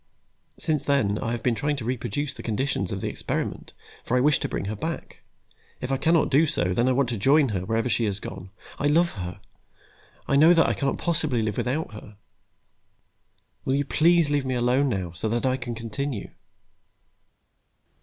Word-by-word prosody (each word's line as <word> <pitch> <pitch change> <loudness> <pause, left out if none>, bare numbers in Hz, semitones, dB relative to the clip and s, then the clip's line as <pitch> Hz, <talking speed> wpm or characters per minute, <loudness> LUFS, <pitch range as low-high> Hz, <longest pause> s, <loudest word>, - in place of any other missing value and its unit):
Since 155 -2 0
then, 110 -8 +1
I - - -2
have 120 0 -3
been 125 - +2
trying 145 +5 -1
to 125 -6 -6
reproduce 125 +3 -2
the - - -9
conditions 110 -4 -1
of 95 -1 -3
the - - -2
experiment, - - -4 0.3
for 125 - 0
I - - +4
wish 145 +3 +4
to - - -3
bring - - -3
her 105 +2 -3
back. 160 +10 -5 0.6
If 125 +1 -4
I 135 - +2
cannot 160 +3 +2
do 150 +4 +5
so, 90 - 0
then 120 +6 +2
I - - +3
want 130 0 +2
to 115 -4 -3
join 140 +5 +4
her, 95 -4 -2
wherever 115 +4 0
she 120 -1 +1
has 100 -1 -1
gone. 95 -1 -8 0.3
I 145 - +1
love 170 +4 +3
her, 90 -2 -6 0.9
I 140 - +3
know 155 +3 +7
now 175 - +7
that 165 - +4
I - - +1
cannot 140 -1 -1
possibly 155 -8 +1
live 110 -2 -2
without 130 0 -2
her. 105 -1 -11 1.5
Will 130 - 0
you 140 0 0
please 165 0 +3
leave 145 -2 +1
me 130 -1 -2
alone, 125 +3 +2
now, 95 -7 -2
so 90 +6 -3
that 120 +3 -1
I 130 0 +2
can 120 -2 -5
continue?" 115 +1 -4
130 Hz, 200 wpm, -25 LUFS, 110-145 Hz, 1.5 s, know